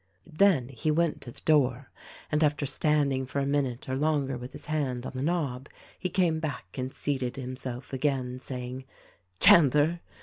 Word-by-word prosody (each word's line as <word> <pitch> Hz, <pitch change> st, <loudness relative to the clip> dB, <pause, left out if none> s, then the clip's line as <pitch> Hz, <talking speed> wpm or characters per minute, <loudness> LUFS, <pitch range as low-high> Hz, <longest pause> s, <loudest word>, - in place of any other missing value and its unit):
Then 160 Hz, -6 st, +3 dB
he 135 Hz, +3 st, -3 dB
went 165 Hz, +1 st, +1 dB
to 120 Hz, -, -8 dB
the -, -, -13 dB
door, 135 Hz, -4 st, +2 dB, 0.4 s
and 150 Hz, +1 st, +2 dB
after 145 Hz, -1 st, +1 dB
standing 140 Hz, -1 st, +1 dB
for 135 Hz, -, -5 dB
a 140 Hz, -, +1 dB
minute 135 Hz, -3 st, -1 dB
or 130 Hz, -, -1 dB
longer 145 Hz, -2 st, 0 dB
with 125 Hz, +2 st, -7 dB
his -, -, -9 dB
hand 135 Hz, -5 st, -2 dB
on -, -, -4 dB
the 130 Hz, -, -4 dB
knob 140 Hz, -5 st, -1 dB, 0.3 s
he 180 Hz, -, -2 dB
came 170 Hz, -3 st, +1 dB
back 145 Hz, -, -5 dB
and 130 Hz, 0 st, -3 dB
seated 130 Hz, -4 st, -2 dB
himself 130 Hz, 0 st, -6 dB
again, 130 Hz, -2 st, -1 dB
saying, 130 Hz, 0 st, -6 dB, 0.5 s
"Chandler 150 Hz, +2 st, +6 dB
135 Hz, 170 wpm, -28 LUFS, 130-150 Hz, 0.5 s, Chandler